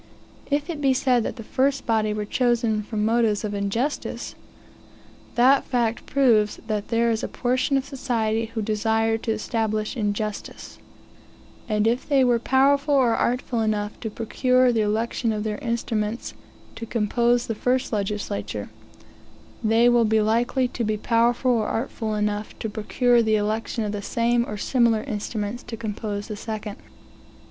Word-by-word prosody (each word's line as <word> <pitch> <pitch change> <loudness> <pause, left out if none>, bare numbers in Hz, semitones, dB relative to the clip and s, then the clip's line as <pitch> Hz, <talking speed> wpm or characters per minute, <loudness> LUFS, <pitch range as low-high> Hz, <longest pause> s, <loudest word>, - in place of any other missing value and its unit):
If 285 +1 0
it 300 -3 -6
be 270 -2 +3
said 250 -2 +2
that - - -3
the 230 - -8
first 270 +4 0
body 220 -2 +1
were 210 0 -2
chosen 235 -2 +1
from 210 0 -2
motives 225 -2 +2
of 210 -1 -3
injustice, 205 +8 -2 1.0
that 260 +3 +5
fact 235 -3 -1
proves 230 -7 +3
that 215 -2 -2
there 235 0 +2
is 220 - -1
a - - -1
portion 255 +3 0
of 270 - -2
society 230 -4 -1
who 220 - -1
desire 225 +1 +1
to 225 - -2
establish 215 0 -2
injustice; 210 -2 -4 0.9
and 210 0 +1
if 235 +5 0
they 275 -2 +4
were 240 -2 +3
powerful 280 +4 +3
or 245 -4 +4
artful 245 -1 0
enough 210 -1 -1
to 220 - -4
procure 250 +3 +2
the 225 - +2
election 225 +2 0
of 210 -1 -2
their 215 +1 -3
instruments 230 -3 -2 0.4
to 230 - -6
compose 235 +2 +1
the 225 - -2
first 250 +3 0
legislature, 205 0 -3 0.9
they 225 +2 +4
will 240 -1 +4
be 220 0 +3
likely 235 +4 +1
to 240 - -3
be 215 -1 0
powerful 235 +3 +2
or 225 -3 +1
artful 225 -2 -2
enough 210 0 -2
to 220 - -4
procure 240 +3 +2
the 220 -1 +2
election 215 +2 -1
of 210 - -2
the 205 -1 -4
same 235 +3 +1
or 210 - -4
similar 235 -1 +2
instruments 215 +2 -4
to 230 -1 -8
compose 210 -2 -4
the 215 - -5
second. 215 -1 -6
225 Hz, 160 wpm, -24 LUFS, 215-245 Hz, 1.0 s, that